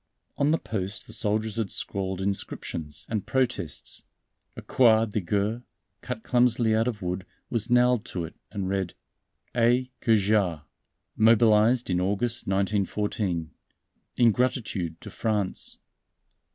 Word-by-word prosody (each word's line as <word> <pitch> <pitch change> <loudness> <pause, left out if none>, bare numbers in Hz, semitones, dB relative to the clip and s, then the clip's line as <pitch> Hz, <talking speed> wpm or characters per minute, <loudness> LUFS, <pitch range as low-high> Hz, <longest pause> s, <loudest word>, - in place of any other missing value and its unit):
On 140 - +2
the 160 - +3
post 100 - -4
the - - -3
soldiers 110 +1 0
had 110 -4 -1
scrawled 95 -1 -1
inscriptions 85 -5 -2
and 110 -3 -3
protests. 120 - -1 0.6
A - - -7
croix 115 -3 +4
de 105 -1 -2
guerre, 105 +6 -1 0.4
cut 110 - -5
clumsily 120 -2 +2
of 110 -2 0
wood, 90 +1 -2 0.3
was 115 -1 -2
nailed 125 -1 +4
to 90 -3 -4
it, 80 - -10 0.2
and 100 -3 -3
read: 95 -2 -2 0.6
"A. 120 +2 +2
Cajard, 100 -7 +2 0.5
mobilized 115 +1 +4
in 90 0 +1
August, 105 +5 0
1914, 95 -3 -1 0.7
in 120 -2 +6
gratitude 105 -9 -1
to - - -9
France." 105 -4 -1
105 Hz, 125 wpm, -26 LUFS, 95-115 Hz, 0.7 s, in